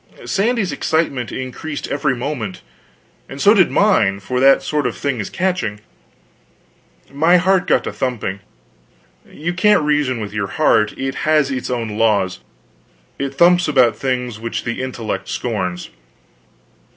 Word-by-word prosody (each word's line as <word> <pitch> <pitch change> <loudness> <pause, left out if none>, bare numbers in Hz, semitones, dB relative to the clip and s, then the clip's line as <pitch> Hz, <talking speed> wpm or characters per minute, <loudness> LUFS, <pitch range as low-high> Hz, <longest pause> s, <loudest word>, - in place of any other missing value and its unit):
Sandy's 215 -1 0
excitement 140 -7 -1
increased 135 +4 -5
every 140 -2 0
moment; 120 -7 -5 0.7
and 135 - -8
so 205 +8 +6
did 190 -5 +4
mine, 110 - +2
for 125 +6 -3
that 135 +1 +5
sort 150 -3 0
of 120 - -5
thing 140 -4 -2
is 105 - -4
catching. 180 - -2 1.3
My 165 +5 +4
heart 185 +1 +2
got - - +3
to - - -5
thumping. 115 -7 -3 0.9
You 170 +4 -4
can't 195 -1 +3
reason 145 -5 +1
with 105 -2 -6
your 100 -2 -2
heart; 105 -5 +2
it 135 0 -3 0.2
has 150 -3 +3
its 130 -2 -3
own 115 -4 -3
laws, 100 -5 +1 0.8
and 140 -1 -2
thumps 175 +5 +4
about 130 -6 +3
things 125 -4 -3
which 115 +1 -4
the 120 +1 -3
intellect 120 -4 -4
scorns. 90 -7 -3
130 Hz, 140 wpm, -19 LUFS, 115-160 Hz, 1.3 s, so